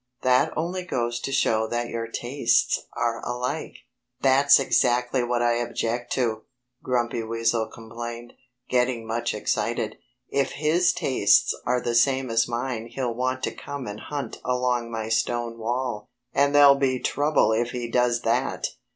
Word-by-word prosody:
That 130 +5 +3
only 175 +3 -2
goes 120 -8 -2
to 135 - -4
show 110 -4 +2
that 120 +1 -2
your 115 0 -3
tastes 120 +4 0
are 115 -1 -1
alike." 125 +1 -3 0.4
"That's 140 +1 +5
exactly 125 -1 +2
what 120 0 0
I 120 0 +2
object 120 0 -2
to!" 115 -4 -1 0.4
Grumpy 120 -2 -1
Weasel 115 0 0
complained, 115 +1 -8 0.3
getting 125 -2 0
much 115 0 -2
excited. 110 +1 -1 0.3
"If 140 -1 0
his 160 +4 +2
tastes 125 -6 +3
are 125 +1 +2
the 120 - -2
same 130 +1 +2
as 115 0 +2
mine 120 -1 -3
he'll 125 -1 -3
want 130 +2 -2
to - - 0
come 140 -2 -7
and 105 0 -6
hunt 140 -5 -5
along 125 -1 0
my 110 -1 -4
stone 115 +1 -1
wall. 120 -1 -3 0.2
And 140 +1 +2
there'll 145 -1 +8
be 135 -2 +1
trouble 145 -3 +2
if 115 +2 +1
he 125 -1 -4
does 120 0 +1
that! - - 0
120 Hz, 150 wpm, -25 LUFS, 115-130 Hz, 0.4 s, there'll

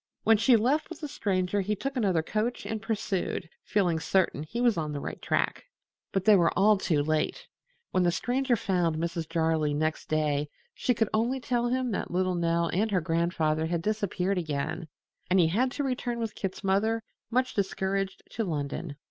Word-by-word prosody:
When 225 0 +5
she 230 +3 +5
left 265 +8 +2
with 340 -2 -8
the 300 - -3
Stranger 195 -5 0
he 210 +2 -1
took 275 +7 -4
another 190 -9 +2
coach 220 +7 -2
and 220 -1 -3
pursued, 200 -5 -2 0.2
feeling 180 -6 +1
certain 180 -3 +1
he 155 +10 -5
was 240 -3 +4
on 155 -2 -2
the 145 - -3
right - - -6
track. - - 0 0.5
But 195 -1 -1
they 215 - +8
were 170 -3 +4
all 210 +3 +6
too 155 -6 +1
late. 155 - -1 0.5
When 185 - +2
the 175 -1 +3
Stranger 250 +6 +1
found 180 -6 0
Mrs. 165 0 -3
Jarley 160 -3 +1
next 155 +1 -1
day 150 -1 +1 0.2
she 250 - 0
could 225 -1 +1
only 235 +5 +1
tell 240 -1 0
him 255 0 0
that 200 - -2
little 185 +1 +1
Nell 170 -1 +1
and 210 +6 +1
her 195 -3 +2
grandfather 165 -1 0
had 170 0 -1
disappeared 200 -2 0
again, 155 +1 -3 0.4
and 185 +1 +4
he 165 -2 +5
had 240 +9 +2
to 290 - -2
return 250 -2 -2
with 225 -2 -3
Kit's 195 0 -5
mother, 220 +4 +1 0.3
much 255 +2 +1
discouraged, 195 0 -1
to 225 - -2
London. 150 -2 -3
190 Hz, 190 wpm, -28 LUFS, 165-225 Hz, 0.5 s, they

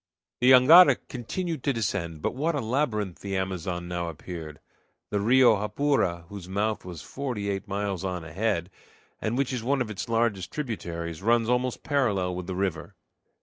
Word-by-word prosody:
The 125 - +4
jangada 140 +8 +8
continued 160 +5 -4
to 140 - +1
descend; 90 -8 -3
but - - 0
what 155 +5 -1
a - - 0
labyrinth 110 - -1
the 100 -1 -3
Amazon 90 -2 -3
now 85 -1 -3
appeared! 80 -1 -8 0.5
The 105 - +1
Rio 120 +2 +5
Japura, 105 -6 0
whose 95 -2 -9
mouth 105 +3 -1
was 85 -6 -8
forty 120 -8 -3
eight 100 +3 -4
miles 100 -2 -2
on 90 -3 -3
ahead, 85 +1 -2 0.5
and 110 +3 -1
which 135 -1 0
is 125 - -2
one 135 +4 +1
of 120 -4 -2
its 105 - -5
largest 115 -5 0
tributaries, 85 - -4
runs 115 +2 +2
almost 125 0 0
parallel 105 -11 +1
with 90 0 -5
the 95 - -3
river. 90 -5 -3
105 Hz, 170 wpm, -27 LUFS, 90-125 Hz, 0.5 s, jangada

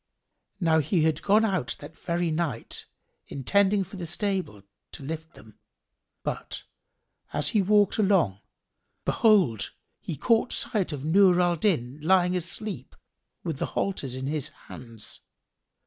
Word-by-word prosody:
Now 165 -3 +3
he 155 +2 +1
had 155 -2 +1
gone 215 +3 +4
out 180 - -1
that 150 +2 -11
very 170 -1 -1
night, 155 -7 -2 0.4
intending 200 +8 +2
for 195 +2 -10
the 175 -2 -5
stable, 180 - -2 0.3
to - - -9
lift 160 +3 -6
them; 110 -1 -16 0.6
but, - - -5 0.7
as 145 - +1
he 210 - +3
walked 205 +2 +3
along, 185 - +3 0.7
behold, 185 - +3 0.3
he 155 - -6
caught 230 - +2
sight 195 -6 0
of 145 -1 -5
Nur 180 +2 +5
al 175 -1 +3
Din 150 - 0
lying 180 +2 +3
asleep, 185 +4 -4 0.5
with 160 -6 -3
the - - -1
halters 140 -10 -1
in 130 0 -4
his 150 0 -1
hands. 115 -4 -8
170 Hz, 135 wpm, -27 LUFS, 145-195 Hz, 0.7 s, Nur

